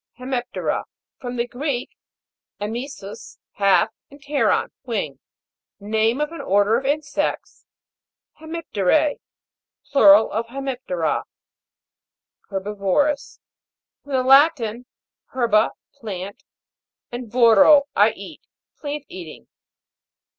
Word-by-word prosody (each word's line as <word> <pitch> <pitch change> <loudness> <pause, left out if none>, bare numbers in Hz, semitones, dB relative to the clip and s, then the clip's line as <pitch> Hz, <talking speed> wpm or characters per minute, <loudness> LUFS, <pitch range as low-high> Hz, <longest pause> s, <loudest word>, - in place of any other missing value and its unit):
HEMIP'TERA. 250 -1 -3 0.3
From 245 -1 -5
the 235 0 0
Greek, 250 +1 -3 0.7
Vmt 225 +5 -3
SMS, 210 -8 -10 0.2
half, 195 0 +4 0.2
and 285 - -15
pteron, 290 +1 0
wing. 195 - -3 0.6
Name 220 +4 0
of 300 +1 -1
an 335 - -7
order 205 +3 +3
of 265 +3 -1
insects. 290 +1 -2 0.7
HEMIP'TERA. 310 - 0 0.7
Plural 215 -6 +7
of 225 +2 -2
Hsemip'tera. 245 - -3 1.2
HERBI'VOROUS. 205 +8 -1 0.6
From 285 - -8
the 260 -1 +2
Latin, 255 -4 +4 0.5
herba, 230 -4 +3 0.2
plant, 200 -7 -7 0.7
and 240 -2 -7
coro, 240 +4 +6
I - - +4
eat. - - -11 0.4
Plant 290 -1 -5
eating. 170 -4 -10
240 Hz, 95 wpm, -22 LUFS, 205-280 Hz, 1.2 s, Plural